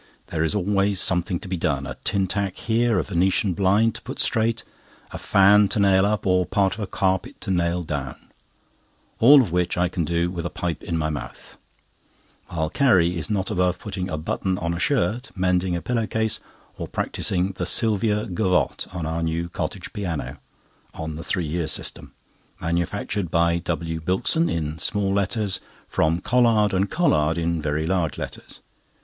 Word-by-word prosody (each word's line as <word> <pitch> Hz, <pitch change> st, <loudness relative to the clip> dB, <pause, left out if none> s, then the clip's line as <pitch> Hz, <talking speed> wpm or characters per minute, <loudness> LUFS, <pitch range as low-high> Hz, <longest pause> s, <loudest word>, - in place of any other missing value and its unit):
There 80 Hz, -1 st, 0 dB
is 80 Hz, -, 0 dB
always 100 Hz, 0 st, +1 dB
something 90 Hz, -1 st, +1 dB
to -, -, -8 dB
be 90 Hz, -1 st, -2 dB
done: 70 Hz, -4 st, -1 dB
a -, -, -6 dB
tin 100 Hz, -2 st, +1 dB
tack 100 Hz, 0 st, -2 dB
here, 115 Hz, -1 st, +1 dB
a -, -, +2 dB
Venetian 95 Hz, +1 st, +1 dB
blind 100 Hz, +5 st, +3 dB
to -, -, -8 dB
put -, -, -7 dB
straight, 115 Hz, 0 st, +1 dB, 0.5 s
a -, -, -6 dB
fan 100 Hz, +1 st, +5 dB
to 100 Hz, +2 st, 0 dB
nail 100 Hz, -1 st, +4 dB
up, 105 Hz, 0 st, -1 dB
or 90 Hz, -1 st, +3 dB
part 100 Hz, -2 st, +1 dB
of 105 Hz, -, -9 dB
a 105 Hz, -, -3 dB
carpet 95 Hz, -1 st, -1 dB
to -, -, -2 dB
nail 85 Hz, -1 st, 0 dB
down—all 75 Hz, -, 0 dB
of 100 Hz, -, -5 dB
which 90 Hz, 0 st, 0 dB
I 90 Hz, 0 st, +2 dB
can 90 Hz, -1 st, -2 dB
do 85 Hz, +2 st, 0 dB
with 85 Hz, -2 st, -4 dB
my 85 Hz, -, -2 dB
pipe 85 Hz, -2 st, -3 dB
in 85 Hz, -, -3 dB
my 80 Hz, -1 st, -1 dB
mouth; 75 Hz, -, -8 dB, 0.9 s
while 80 Hz, -2 st, -2 dB
Carrie 90 Hz, -10 st, +3 dB
is 80 Hz, -3 st, -3 dB
not 100 Hz, -2 st, -1 dB
above 90 Hz, 0 st, +1 dB
putting 95 Hz, -4 st, -5 dB
a 80 Hz, -, -2 dB
button 90 Hz, +4 st, -2 dB
on 85 Hz, 0 st, -2 dB
a 85 Hz, -, -4 dB
shirt, 125 Hz, +1 st, 0 dB
mending 90 Hz, -1 st, +1 dB
a 85 Hz, -, -4 dB
pillow 115 Hz, -3 st, -1 dB
case, 110 Hz, +2 st, -1 dB, 0.4 s
or -, -, -4 dB
practising 95 Hz, -2 st, -1 dB
the 90 Hz, -1 st, -4 dB
"Sylvia 105 Hz, 0 st, +1 dB
Gavotte" 90 Hz, -1 st, 0 dB
on 90 Hz, -3 st, -4 dB
our 80 Hz, +1 st, -2 dB
new 85 Hz, +1 st, -2 dB
cottage -, -, -5 dB
piano 90 Hz, -7 st, -4 dB, 0.6 s
(on 80 Hz, -1 st, -5 dB
the 80 Hz, -, -7 dB
three 90 Hz, +2 st, 0 dB
years' 80 Hz, +1 st, -1 dB
system), -, -, -5 dB, 0.5 s
manufactured 85 Hz, +2 st, -2 dB
by 85 Hz, 0 st, +2 dB
W. 80 Hz, -1 st, -3 dB
Bilkson 95 Hz, -, +1 dB
(in 80 Hz, -1 st, -3 dB
small 100 Hz, +3 st, 0 dB
letters), 100 Hz, -1 st, 0 dB, 0.3 s
from 80 Hz, +2 st, +1 dB
Collard 115 Hz, -4 st, +3 dB
and 95 Hz, +2 st, +1 dB
Collard 80 Hz, -, +2 dB
(in 85 Hz, -1 st, -1 dB
very 75 Hz, +1 st, -1 dB
large 85 Hz, -2 st, 0 dB
letters). -, -, -8 dB
90 Hz, 180 wpm, -23 LUFS, 85-100 Hz, 0.9 s, fan